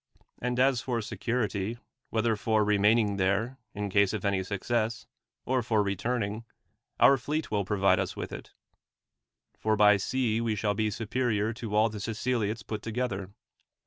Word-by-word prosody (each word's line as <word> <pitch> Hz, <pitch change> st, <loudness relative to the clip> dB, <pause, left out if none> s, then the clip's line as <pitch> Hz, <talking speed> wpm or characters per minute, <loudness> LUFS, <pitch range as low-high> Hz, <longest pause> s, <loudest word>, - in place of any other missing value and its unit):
And 125 Hz, 0 st, -1 dB
as 130 Hz, -2 st, +3 dB
for 120 Hz, -3 st, -1 dB
security, 110 Hz, -1 st, -2 dB, 0.3 s
whether 115 Hz, 0 st, +1 dB
for 110 Hz, 0 st, +1 dB
remaining 105 Hz, 0 st, +3 dB
there, 100 Hz, +7 st, 0 dB, 0.2 s
in 105 Hz, -1 st, -3 dB
case 100 Hz, 0 st, +3 dB
of 105 Hz, -3 st, -3 dB
any 100 Hz, -1 st, +1 dB
success, 110 Hz, +4 st, -2 dB, 0.4 s
or 130 Hz, 0 st, +1 dB
for 110 Hz, -2 st, +1 dB
returning, 105 Hz, +2 st, -2 dB, 0.6 s
our 140 Hz, -, +7 dB
fleet 150 Hz, +5 st, -3 dB
will 100 Hz, -2 st, 0 dB
provide 95 Hz, -1 st, +3 dB
us 95 Hz, -3 st, -2 dB
with -, -, -5 dB
it; -, -, -8 dB, 1.1 s
for 110 Hz, 0 st, +1 dB
by 105 Hz, -1 st, +6 dB
sea 115 Hz, +2 st, 0 dB
we 115 Hz, -2 st, 0 dB
shall 105 Hz, 0 st, 0 dB
be 110 Hz, +1 st, 0 dB
superior 110 Hz, 0 st, -1 dB
to 110 Hz, -2 st, -5 dB
all 110 Hz, +1 st, +5 dB
the 110 Hz, -1 st, -6 dB
Siceliots 115 Hz, 0 st, -2 dB
put 110 Hz, -1 st, -5 dB
together. 110 Hz, -5 st, -3 dB
110 Hz, 155 wpm, -29 LUFS, 100-120 Hz, 1.1 s, our